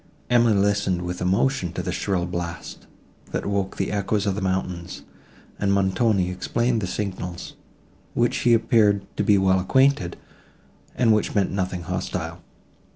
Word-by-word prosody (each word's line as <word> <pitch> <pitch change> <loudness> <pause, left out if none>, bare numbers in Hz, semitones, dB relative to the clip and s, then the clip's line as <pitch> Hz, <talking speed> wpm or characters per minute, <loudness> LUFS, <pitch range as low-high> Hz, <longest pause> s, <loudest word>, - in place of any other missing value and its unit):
Emily 120 -3 +4
listened 100 -3 +1
with 90 0 -4
emotion 95 0 +1
to 90 - -4
the 90 - -2
shrill 90 0 -1
blast, 85 -1 -6 0.4
that - - -3
woke 100 -1 -2
the 95 - -1
echoes 100 0 0
of 100 - +1
the 105 - -4
mountains, 90 -2 -3 0.6
and 100 -1 +1
Montoni 95 0 +2
explained 115 +5 0
the 95 - -2
signals, 90 -3 -5 0.6
with - - 0
which 120 - +1
he 120 -1 +4
appeared 110 -4 +3
to - - 0
be 105 - +4
well 95 -1 +3
acquainted, 130 -2 +2 0.8
and 115 -3 +4
which 105 - 0
meant 100 -2 +2
nothing 95 -2 -2
hostile. 90 -2 -4
95 Hz, 155 wpm, -24 LUFS, 90-105 Hz, 0.8 s, Emily